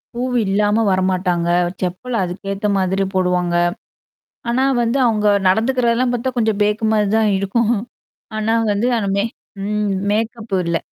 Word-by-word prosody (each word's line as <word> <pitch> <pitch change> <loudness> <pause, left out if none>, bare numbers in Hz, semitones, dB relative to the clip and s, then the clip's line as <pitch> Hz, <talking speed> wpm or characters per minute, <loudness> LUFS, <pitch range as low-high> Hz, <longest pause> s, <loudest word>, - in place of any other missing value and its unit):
பூவு 250 0 -1
இல்லாம 210 +3 +2
வரமாட்டாங்க 185 -2 0 0.3
செப்பல் 185 +8 -3
அதுக்கேத்த 195 +3 -3
மாதிரி 190 +1 0
போடுவாங்க. 180 -2 +1 0.9
ஆனா 255 +3 +1 0.2
வந்து 235 +3 0
அவுங்க 210 -2 +1 0.2
நடந்துக்கிறதெல்லாம் 240 +3 +1
பாத்தா 255 +2 -2
கொஞ்சம் 220 -2 0
பேக்குமாரி 210 0 +1
தான் 215 -2 +2
இருக்கும். 225 +4 +1 0.6
ஆனா 220 +1 +1 0.2
வந்து 210 +5 +1
ஆனா 200 -3 -1
மேக் 225 +3 -2 0.3
ம் 210 -1 -1 0.2
மேக்கப் 225 -1 -2
இல்ல. 170 0 +1
210 Hz, 125 wpm, -19 LUFS, 190-230 Hz, 0.9 s, இல்லாம